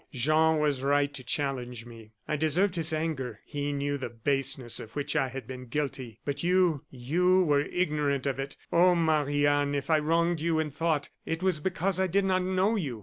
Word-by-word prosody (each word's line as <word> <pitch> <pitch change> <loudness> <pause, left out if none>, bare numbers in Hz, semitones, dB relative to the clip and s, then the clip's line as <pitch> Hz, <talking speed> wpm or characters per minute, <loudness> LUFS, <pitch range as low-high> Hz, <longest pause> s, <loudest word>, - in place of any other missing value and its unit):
Jean 155 +5 +3
was 145 -3 +1
right 145 +1 +2
to 135 -2 -8
challenge 125 -3 -2
me. 115 -2 -13 0.2
I 150 - 0
deserved 165 +6 +1
his 160 -2 -1
anger. 150 -8 -3
He 145 -1 -3
knew 145 0 -2
the 130 - -4
baseness 135 +1 -1
of 110 - -10
which 145 +1 -2
I 140 -4 +2
had 135 +1 -7
been 130 -1 -8
guilty; 130 -4 -4
but 140 0 -2
you 175 -4 +2
you 180 +9 +2
were 145 -4 +3
ignorant 150 -5 -1
of 135 -1 -1
it. 135 0 -5 0.2
Oh! 180 +1 +5
Marie 150 -3 +2
Anne, 145 0 +2
if 140 +3 -2
I 155 - +5
wronged 165 +2 +1
you 165 0 +1
in 155 -1 -1
thought 150 0 -1 0.2
it 165 +2 -2
was 185 -5 +2
because 185 +3 0
I 190 - +2
did 195 +2 +1
not 185 -1 +2
know 190 +4 +1
you. 140 - -3
145 Hz, 205 wpm, -28 LUFS, 135-165 Hz, 0.2 s, Oh